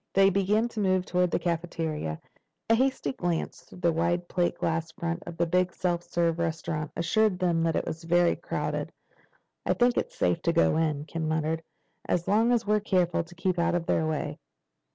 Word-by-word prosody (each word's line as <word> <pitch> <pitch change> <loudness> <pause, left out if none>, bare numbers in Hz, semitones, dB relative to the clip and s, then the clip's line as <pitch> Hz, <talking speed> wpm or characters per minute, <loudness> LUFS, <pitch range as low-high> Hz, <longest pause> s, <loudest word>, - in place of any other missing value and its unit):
They 195 0 +6
began 200 +4 +2
to 230 - -6
move 185 -2 +2
toward 180 -1 +1
the - - +1
cafeteria. 160 - -2 0.5
A - - +8
hasty 255 - +1
glance 175 +1 -2
through 180 - -15
the 170 -2 +3
wide 170 +2 0
plate 175 -1 0
glass 165 0 -1
front 170 +1 -3
of 170 -1 -7
the 170 - +2
big 180 +2 +1
self 175 -1 -1
service 170 -1 0
restaurant 160 -2 -2
assured 210 +3 +2
them 175 -3 +1
that 165 -1 +1
it - - 0
was 165 +1 -5
very 175 +1 +3
crowded. - - -3 0.7
"I - - +1
think 245 0 +3
it's - - -2
safe 90 -1 +1
to 170 - +1
go 170 - +3
in," 150 -2 0
Ken 160 +1 -3
muttered, 160 +1 0 0.5
"as 175 -1 0
long 225 +4 +3
as 240 -2 +2
we're 210 +1 +3
careful 180 -5 +1
to 175 +1 -16
keep 180 0 -1
out 170 - +2
of 175 -1 -1
their 160 - +1
way." 155 -1 -3
170 Hz, 195 wpm, -28 LUFS, 165-185 Hz, 0.7 s, A